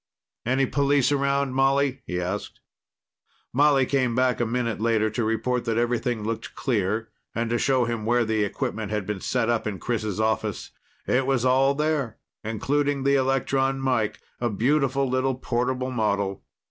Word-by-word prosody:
"Any 130 +2 +3
police 140 +1 +2
around, 140 -1 +1
Molly?" 135 0 +2
he 90 0 -2
asked. 90 +3 -4 0.9
Molly 140 0 +4
came 130 -3 +1
back 125 0 +2
a 120 - +1
minute 115 -2 -1
later 110 -1 +2
to 120 +2 -1
report 115 +3 0
that 115 -1 0
everything 120 -1 0
looked 115 +1 -4
clear 110 -2 -1 0.3
and 115 0 -1
to 120 - +1
show 130 -3 +2
him 115 -2 -3
where 120 +1 +2
the 110 -1 +1
equipment 105 +1 -3
had 105 -2 -1
been 105 -2 -4
set 115 - 0
up 120 -2 0
in 100 -3 -3
Chris' 110 -2 -2
office. 110 -1 -1 0.3
It 130 +1 +1
was 130 -3 +1
all 135 +2 +4
there, 150 -6 -1 0.3
including 140 +6 0
the 140 +1 +3
electron 135 0 +1
mike 125 -5 0 0.2
a 120 - 0
beautiful 135 +4 +1
little 130 +1 0
portable 130 +1 -1
model. 100 -4 -1
125 Hz, 160 wpm, -25 LUFS, 110-135 Hz, 0.9 s, Molly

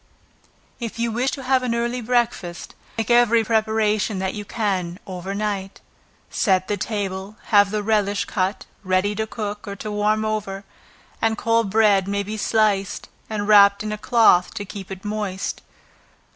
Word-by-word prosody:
If 235 -2 -5
you 235 0 0
wish 245 +4 0
to 270 - -5
have 260 0 +2
an 245 -2 -1
early 240 +1 -1
breakfast, 235 -7 -1 0.2
make 225 +1 -1
every 235 -1 +5
preparation 220 -2 +1
that 190 0 -2
you 210 - -5
can, 190 -5 -2
over 190 0 -5
night; 200 -2 -3 0.5
set 185 -3 +2
the 205 - 0
table, 200 -1 -4
have 205 -2 +5
the 210 0 -2
relish 205 -2 +1
cut, 190 0 -2 0.2
ready 185 +2 +1
to 220 +1 -2
cook, 210 -2 -5
or 200 - -5
to 210 +2 -6
warm 210 +1 +1
over 205 -2 -3 0.6
and 225 -1 +1
cold 230 -1 +1
bread 205 -2 +3
may 200 0 -1
be 210 +2 -5
sliced, 210 -3 0 0.2
and 205 -2 -3
wrapped 200 -1 +6
in 215 - -3
a 210 - -3
cloth 225 -7 +4
to 205 -2 -4
keep 195 -1 -9
it 190 +1 -8
moist. 205 -2 -3
210 Hz, 165 wpm, -22 LUFS, 195-220 Hz, 0.6 s, wrapped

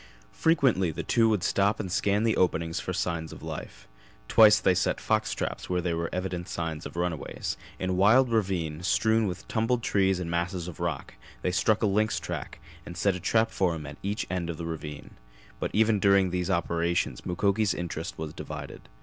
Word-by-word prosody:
Frequently 135 - +3
the 80 - -4
two 115 -2 +3
would 105 -5 +1
stop 100 +3 +2
and 95 -4 -4
scan 100 +3 +1
the 115 -1 +2
openings 85 -1 +1
for - - -4
signs 85 -3 -2
of - - -11
life. - - -7 0.4
Twice 110 -1 +7
they 95 - +3
set 90 - 0
fox - - 0
traps - - -4
where 90 0 +1
there 85 -1 -1
were 85 0 -2
evident 90 -1 -3
signs 80 -4 -4
of - - -13
runways; 85 -2 -3 0.2
in 95 0 -2
a - - +1
wild 110 +7 +5
ravine, 90 -8 0
strewn 110 +4 +2
with 90 -2 -6
tumbled 115 +1 0
trees 95 -3 +2
and 90 - -4
masses 85 +1 -2
of 90 - -8
rock, - - -3 0.3
they 90 - +1
struck 105 +4 +2
a - - +5
lynx 105 +2 +1
track - - -6 0.3
and 85 +2 -9
set 100 +2 +2
a 90 - -5
trap 110 +5 +2
for 90 -3 +1
him 75 -2 -7
at 75 -1 -9
each 100 +2 -2
end 90 -2 -3
of 85 - -4
the 85 - -5
ravine; 75 -2 -6 0.5
but - - -1
even 110 -1 +3
during 100 -2 +4
these 90 -1 -1
operations 85 0 0
Mukoki's 100 +2 +1
interest 85 -2 -5
was 80 -1 -5
divided. - - -8
90 Hz, 200 wpm, -28 LUFS, 85-105 Hz, 0.5 s, Twice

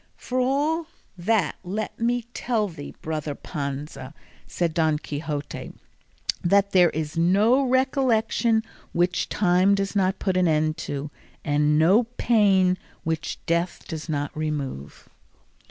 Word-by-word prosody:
"For 255 +1 -3
all 295 +6 +1 0.3
that 195 +3 +1
let 200 +4 -4
me 240 +1 +1
tell 225 -4 0
thee, 160 -6 -9
brother 155 -2 -3
Panza," 140 -2 -6 0.3
said 170 -2 -1
Don 160 -2 +2
Quixote, 150 -1 -5 0.7
"that 200 +3 +3
there 180 -2 +6
is 155 +1 -3
no 205 +10 +4
recollection 250 -4 +2 0.3
which 175 +1 +1
time 185 0 +3
does 195 +1 -2
not 190 -1 +2
put 190 -2 0
an 180 -1 +3
end 155 0 +1
to, 145 +1 -4 0.3
and 150 +1 +2
no 190 +10 +5
pain 190 -5 +3 0.2
which 160 0 -2
death 170 +2 -1
does 160 -1 -6
not 145 -2 -2
remove." 145 - -4
180 Hz, 125 wpm, -25 LUFS, 155-215 Hz, 0.7 s, there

